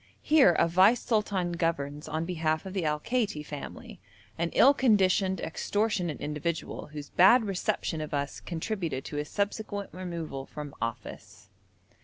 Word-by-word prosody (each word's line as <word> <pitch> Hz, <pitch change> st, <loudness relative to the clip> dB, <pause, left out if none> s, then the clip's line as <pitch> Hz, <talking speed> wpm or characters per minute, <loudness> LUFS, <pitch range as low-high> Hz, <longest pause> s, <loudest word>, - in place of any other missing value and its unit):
Here 295 Hz, -, +6 dB
a 170 Hz, -, +3 dB
vice 190 Hz, +8 st, +5 dB
sultan 205 Hz, -6 st, 0 dB
governs 155 Hz, -4 st, -2 dB
on 160 Hz, +2 st, -2 dB
behalf 160 Hz, -2 st, -1 dB
of 190 Hz, -, -6 dB
the 190 Hz, -4 st, -1 dB
Al 150 Hz, 0 st, 0 dB
Kaiti 210 Hz, -7 st, -1 dB
family, 145 Hz, -1 st, -8 dB, 0.4 s
an 170 Hz, 0 st, -1 dB
ill 275 Hz, -, +7 dB
conditioned, 195 Hz, -7 st, +3 dB
extortionate 185 Hz, -1 st, -1 dB
individual, 155 Hz, +2 st, -3 dB
whose 150 Hz, -1 st, -9 dB
bad 210 Hz, +7 st, +6 dB
reception 180 Hz, -4 st, -2 dB
of 155 Hz, -, -5 dB
us 140 Hz, -1 st, -2 dB
contributed 170 Hz, -5 st, -4 dB
to 145 Hz, -, -5 dB
his 150 Hz, 0 st, -3 dB
subsequent 205 Hz, 0 st, -3 dB
removal 170 Hz, -7 st, -5 dB
from 150 Hz, -2 st, -8 dB
office. 115 Hz, -1 st, -6 dB
170 Hz, 145 wpm, -28 LUFS, 150-200 Hz, 0.4 s, ill